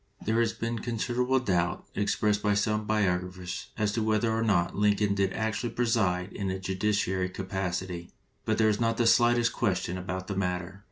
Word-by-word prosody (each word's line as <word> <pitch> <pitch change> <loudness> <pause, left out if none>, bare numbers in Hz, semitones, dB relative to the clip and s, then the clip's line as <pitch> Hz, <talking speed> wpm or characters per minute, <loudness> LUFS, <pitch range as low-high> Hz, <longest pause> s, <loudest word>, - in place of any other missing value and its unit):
There 110 +2 +2
has 115 -1 +2
been 115 0 -3
considerable 125 +3 0
doubt 90 -8 0
expressed 105 0 +1
by 105 -1 +2
some 105 +1 0
biographers 90 -3 -1
as 105 -2 +1
to 115 - -1
whether 110 +1 +1
or 110 0 0
no 95 -6 +3
Lincoln 105 0 +2
did 100 -1 +1
actually 110 +2 -2
preside 105 -7 +1
in 100 -1 -3
a 95 - -2
judiciary 95 -1 0
capacity, 90 -2 -4 0.3
but - - 0
there 110 - +4
is 105 - 0
not 115 0 +1
the 120 - +2
slightest 120 0 +4
question 90 -4 -1
about 95 0 -4
the 100 - -4
matter. 90 0 -2
100 Hz, 175 wpm, -28 LUFS, 95-110 Hz, 0.3 s, there